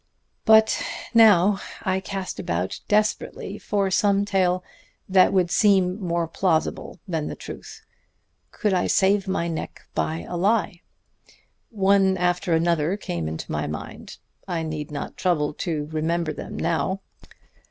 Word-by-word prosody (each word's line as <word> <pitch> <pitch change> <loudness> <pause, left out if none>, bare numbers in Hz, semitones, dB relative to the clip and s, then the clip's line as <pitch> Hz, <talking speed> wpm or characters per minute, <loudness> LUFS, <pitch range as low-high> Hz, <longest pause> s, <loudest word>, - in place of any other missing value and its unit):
"But 220 0 +5 0.3
now 205 -4 +6 0.2
I 190 -1 0
cast 190 0 -5
about 90 +2 -2
desperately 210 -1 -1
for 200 -2 -1
some 200 +1 +2
tale 185 -2 +1 0.4
that 185 -1 +5
would 180 -2 +2
seem 190 -1 +3
more 170 -2 -1
plausible 165 -1 -1
than 160 -4 -2
the - - -5
truth. - - -10 0.6
Could 210 - -1
I 180 - +1
save 195 0 +2
my 180 -3 -1
neck 165 -2 -5
by 80 +1 -1
a - - -5
lie? 195 -2 +1 0.9
One 195 -3 +3
after 180 0 +1
another 170 +2 +1
came 85 - -4
into 80 +1 -5
my 75 -1 -2
mind; 75 +1 -7 0.3
I 170 -3 -2
need 155 -1 -4
not 145 -1 -6
trouble 155 -5 +1
to 155 -4 -2
remember 160 +1 -1
them - - -7
now. 170 +4 -1
180 Hz, 135 wpm, -24 LUFS, 160-195 Hz, 0.9 s, now